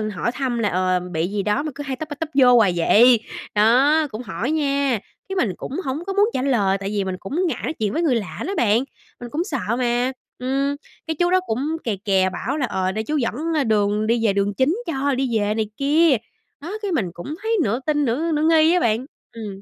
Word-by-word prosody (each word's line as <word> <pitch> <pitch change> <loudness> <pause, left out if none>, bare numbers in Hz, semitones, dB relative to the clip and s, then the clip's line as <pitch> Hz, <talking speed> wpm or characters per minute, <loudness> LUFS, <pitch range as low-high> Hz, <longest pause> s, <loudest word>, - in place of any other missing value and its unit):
hỏi 235 - -1
thăm 255 -3 -2
là, 210 -3 +1
ờ, 185 0 +1
"bị 175 -2 -2
gì 200 +1 -2
đó 210 +8 0
mà 305 - -4
cứ 290 - -5
hay 275 -2 -3
tấp 310 +4 -7
ra 290 - -5
tấp 325 - -3
vô 250 -3 +6
hoài 210 -6 +4
vậy." 230 +8 +5 0.4
Đó, 270 +9 +4
cũng 215 - -5
hỏi 250 +2 -3
nha, 280 -6 +1 0.3
cái 385 - -3
mình 240 - +1
cũng - - -7
hổng 280 +6 -3
có 390 - -2
muốn 410 +2 +3
trả 255 - -1
lời 205 -8 +2
tại 195 0 -4
vì 205 -1 -1
mình 190 -1 -3
cũng 300 - -2
ngại 325 - -2
nói - - -2
chuyện 215 -7 -2
với 330 - 0
người 305 -7 +2
lạ 210 -5 -4
đó 390 - -2
bạn, 225 +2 +3 0.4
mình 240 - -7
cũng 310 +7 -1
sợ 235 - -2
mà. 245 +1 +1 0.3
Ừm, 275 +3 0 0.3
cái 320 - -1
chú 350 +3 +1
đó 370 - +5
cũng 285 +8 -1
kè 225 -4 -1
kè 190 -2 +3
bảo 185 +10 -3
là, 280 - 0
ờ, 190 -4 -1
để 220 +2 -3
chú 300 +7 -1
dẫn, 240 -5 0 0.2
ơ, 295 - +2
đường 210 -1 +1
đi 230 0 +1
về 205 - +3
đường 200 +1 0
chính 265 - +2
cho 280 -3 0
đi 255 -3 0
về 205 0 0
này 215 -1 -2
kia. 295 +2 +4 0.5
Đó, 335 +7 -6
cái 405 -3 -2
mình 205 - -1
cũng 280 - -6
thấy 450 0 0
nửa 225 +4 0
tin 295 -1 +1
nửa 290 +8 0
nửa 300 -1 +1
nghi 320 +1 +5
á 360 - +3
bạn. 230 -2 +1 0.3
Ừm, 205 -4 -7
250 Hz, 250 wpm, -22 LUFS, 210-300 Hz, 0.5 s, vô